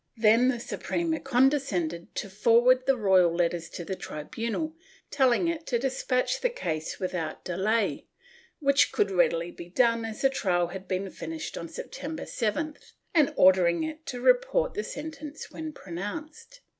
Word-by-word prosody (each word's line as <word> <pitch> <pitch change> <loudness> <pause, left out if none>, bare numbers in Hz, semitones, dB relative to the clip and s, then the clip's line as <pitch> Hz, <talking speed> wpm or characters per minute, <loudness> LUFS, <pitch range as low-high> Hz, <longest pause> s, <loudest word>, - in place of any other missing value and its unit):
Then 225 +3 +5
the 255 -2 +1
Suprema 320 +6 -2
condescended 240 - +1
to - - -3
forward 235 +6 +4
the 270 -1 +4
royal 190 -5 +4
letters 170 -1 0
to 175 - -7
the 190 - -3
tribunal, 230 - -4 0.4
telling 265 +3 +3
it 335 -1 -3
to 240 - +1
despatch 260 - 0
the - - +2
case 160 - -4
without 175 -4 -4
delay, 200 +5 0 0.5
which 280 -2 +3
could 200 - +1
readily 175 -2 +2
be 170 0 -10
done 230 +3 +2
as 225 -1 -6
the 270 - +5
trial 175 -8 +1
had 190 +1 -8
been 190 +1 -2
finished 320 -1 -6
on - - -6
September 320 -9 -6
7th, 295 +7 -3 0.2
and 305 -5 +4
ordering 185 - +5
it 315 0 -5
to 250 - -4
report - - +3
the 420 - -2
sentence 305 0 -7
when 315 -1 -6
pronounced. 300 - -7
235 Hz, 155 wpm, -28 LUFS, 185-305 Hz, 0.5 s, Then